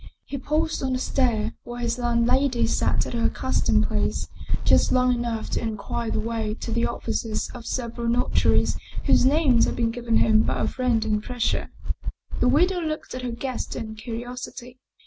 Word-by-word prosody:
He 280 - -5
paused 310 +4 0
on 260 -1 0
the - - +1
stair, 245 -4 +1
where 240 0 -7
his 240 +1 -1
landlady 240 +2 +2
sat - - +1
at - - -6
her 230 -1 +2
accus 260 - -1
tomed 215 0 +3
place, 215 -1 -1 0.4
just - - +4
long 250 0 +4
enough 235 -2 -2
to - - 0
inquire 225 +1 -3
the - - -1
way 220 -1 -2
to 230 - -6
the 235 +1 +1
offices 225 -2 -3
of 240 -2 -9
several 235 -1 -3
notaries 240 +1 +2 0.3
whose 255 - +5
names 275 -5 +4
had - - -2
been 230 -1 +1
given 230 -1 0
him 220 -1 +5
by - - 0
a - - +1
friend 245 -4 +1
in 210 -1 +1
Brescia. 240 +2 -1 0.7
The 250 - +4
widow 355 +7 +3
looked 310 -1 -4
at 255 - -4
her 250 - -3
guest 245 +1 -4
in 220 -1 -5
curiosity. 245 +2 -7
240 Hz, 185 wpm, -25 LUFS, 230-255 Hz, 0.7 s, whose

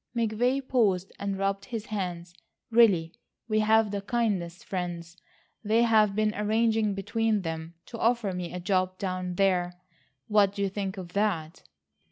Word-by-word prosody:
McVay 245 +4 0
paused 195 -7 +1
and 200 -1 -2
rubbed 195 0 -1
his 225 0 -5
hands; 180 -4 -4 0.4
"Really, 195 -8 +4 0.3
we 215 -1 +1
have 220 0 +3
the 200 -1 -3
kindest 200 -6 -2
friends; 175 -2 -4 0.5
they 225 +2 +3
have 215 -3 +4
been 215 0 +1
arranging 220 0 +1
between 215 +1 0
them 160 0 -5
to 230 - -9
offer 230 -4 +1
me 180 -1 -4
a 180 - -5
job 185 0 0
down 185 -2 -3
there. 180 -2 +2 0.5
What 205 -2 +3
do 200 - -1
you 195 - +1
think 195 0 -4
of 180 -2 -8
that?" 190 -5 -1
200 Hz, 155 wpm, -28 LUFS, 180-220 Hz, 0.5 s, Really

